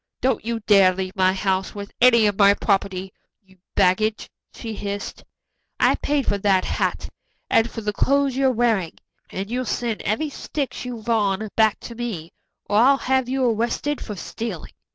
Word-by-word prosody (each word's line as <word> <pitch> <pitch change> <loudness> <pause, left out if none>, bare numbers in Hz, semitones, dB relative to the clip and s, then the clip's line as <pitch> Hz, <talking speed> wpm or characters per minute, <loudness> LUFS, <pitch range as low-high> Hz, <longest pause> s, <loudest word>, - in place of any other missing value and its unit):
"Don't 265 - 0
you 230 0 -3
dare 195 -3 +5
leave 190 +1 -4
my 185 -1 +3
house 190 0 -1
with 200 -1 -7
any 235 -3 +6
of 205 -1 +2
my 200 0 +6
property, 190 -2 -1 0.3
you 190 -1 -24 0.2
baggage," 215 +4 +1 0.2
she 225 -1 -7
hissed. 200 -1 -5 0.6
"I - - +4
paid 285 -2 -1
for 200 - 0
that 190 -2 +2
hat - - -2 0.4
and 225 +1 +3
for 225 - -7
the 210 -1 -2
clothes 275 +3 +1
you're 270 0 +3
wearing, 225 -8 0 0.3
and 195 +3 -5
you'll 250 +1 -1
send 235 -3 -2
every 290 +9 -1
stitch 275 -3 -4
you've 235 -3 -7
on 215 -2 +1
back 220 -2 +3
to 235 - -8
me, 220 -9 -5 0.3
or 205 - +1
I'll 270 +4 +5
have 260 -1 0
you 265 0 0
arrested 235 +5 -1
for 210 - -6
stealing." 200 -1 -6
215 Hz, 175 wpm, -22 LUFS, 195-245 Hz, 0.6 s, any